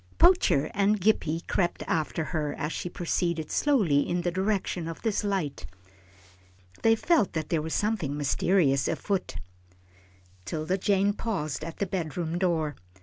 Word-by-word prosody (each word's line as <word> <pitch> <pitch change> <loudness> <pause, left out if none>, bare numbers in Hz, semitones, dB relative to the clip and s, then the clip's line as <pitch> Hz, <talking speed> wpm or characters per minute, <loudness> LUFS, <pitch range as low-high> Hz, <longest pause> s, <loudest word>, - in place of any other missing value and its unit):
Poacher 345 - +4
and 200 +1 +2
Gippie 170 -5 +1
crept 175 -2 0
after 160 0 -1
her 150 -2 -2
as 150 0 -2
she 175 - -4
proceeded 170 -2 -2
slowly 210 - +3
in 175 0 0
the 175 0 -1
direction 190 -2 -1
of 165 - -7
this 220 -3 0
light. 190 -8 -2 1.1
They 225 0 +5
felt 235 - +2
that 155 -2 -3
there 165 -3 +1
was 160 +1 -3
something 195 -10 -1
mysterious 145 -1 +2
afoot. 195 -2 -2 1.1
'Tilda 160 - -2
Jane 200 +1 +2
paused 160 - -3
at 165 +1 -6
the 200 - 0
bedroom 175 -2 -3
door. 160 -5 0
175 Hz, 145 wpm, -27 LUFS, 155-200 Hz, 1.1 s, They